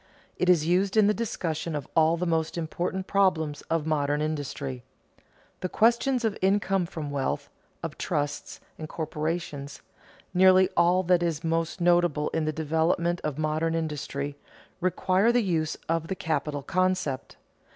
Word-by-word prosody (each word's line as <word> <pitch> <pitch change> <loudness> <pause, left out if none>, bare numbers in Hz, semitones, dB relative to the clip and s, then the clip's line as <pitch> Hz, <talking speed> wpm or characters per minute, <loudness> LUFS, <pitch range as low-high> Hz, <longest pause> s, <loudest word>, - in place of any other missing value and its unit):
It 180 - 0
is 170 -4 +5
used 190 +4 +2
in 215 - +6
the 210 - +4
discussion 170 -8 -3
of 145 -3 -4
all 160 +1 +4
the 180 - -1
most 165 -1 0
important 175 +3 -2
problems 160 -8 +1
of 165 -2 0
modern 145 -2 +1
industry. 145 -4 -3 0.8
The 185 - -3
questions 235 +4 +2
of 220 - 0
income 195 -1 +2
from 150 -4 -5
wealth, 145 +1 -2 0.3
of 165 -2 -5
trusts 145 -3 -2 0.2
and 155 0 -6
corporations, 155 -2 -4 0.5
nearly 185 0 +6
all 175 +2 +4
that 180 -1 +3
is 165 -2 -1
most 165 +2 -1
notable 175 -4 +3
in 160 -1 -1
the 155 - +1
development 160 +3 0
of 150 -2 -2
modern 155 +1 0
industry, 145 -3 -3 0.4
require 185 +4 +2
the 240 -1 +2
use 160 -5 -1
of 165 0 0
the 190 - -2
capital 150 -4 -2
concept. 185 -5 -1
165 Hz, 150 wpm, -27 LUFS, 150-185 Hz, 0.8 s, in